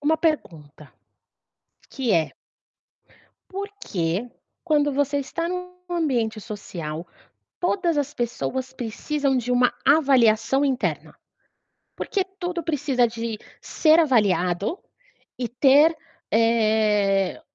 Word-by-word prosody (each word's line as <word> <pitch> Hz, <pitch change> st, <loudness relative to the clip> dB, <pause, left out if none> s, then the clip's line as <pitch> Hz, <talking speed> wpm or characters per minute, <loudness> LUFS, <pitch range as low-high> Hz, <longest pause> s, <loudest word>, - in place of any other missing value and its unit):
Uma 305 Hz, +2 st, +2 dB
pergunta, 160 Hz, -, -3 dB, 1.0 s
que 250 Hz, -6 st, -1 dB
é 165 Hz, -3 st, +1 dB, 1.2 s
Por 395 Hz, +1 st, -4 dB
que, 180 Hz, +6 st, -2 dB, 0.3 s
quando 295 Hz, -3 st, +2 dB
você 285 Hz, +1 st, 0 dB
está 335 Hz, +5 st, -3 dB
num 360 Hz, 0 st, -4 dB, 0.2 s
ambiente 250 Hz, -11 st, -1 dB
social, 170 Hz, -6 st, -6 dB, 0.5 s
todas 350 Hz, -2 st, 0 dB
as 290 Hz, 0 st, -1 dB
pessoas 255 Hz, +2 st, -3 dB
precisam 265 Hz, +4 st, -1 dB
de 245 Hz, +1 st, -2 dB
uma 245 Hz, 0 st, +4 dB
avaliação 270 Hz, -3 st, +4 dB
interna? 265 Hz, -2 st, -2 dB, 0.8 s
Porque 395 Hz, -, -1 dB, 0.2 s
tudo 350 Hz, -2 st, -3 dB
precisa 280 Hz, -6 st, +1 dB
de 230 Hz, -1 st, -5 dB, 0.2 s
ser 315 Hz, 0 st, +3 dB
avaliado 205 Hz, -, +2 dB, 0.6 s
e 245 Hz, -2 st, -2 dB
ter, 285 Hz, +6 st, +5 dB, 0.3 s
eh, 215 Hz, -4 st, +2 dB
255 Hz, 100 wpm, -24 LUFS, 215-300 Hz, 1.2 s, ter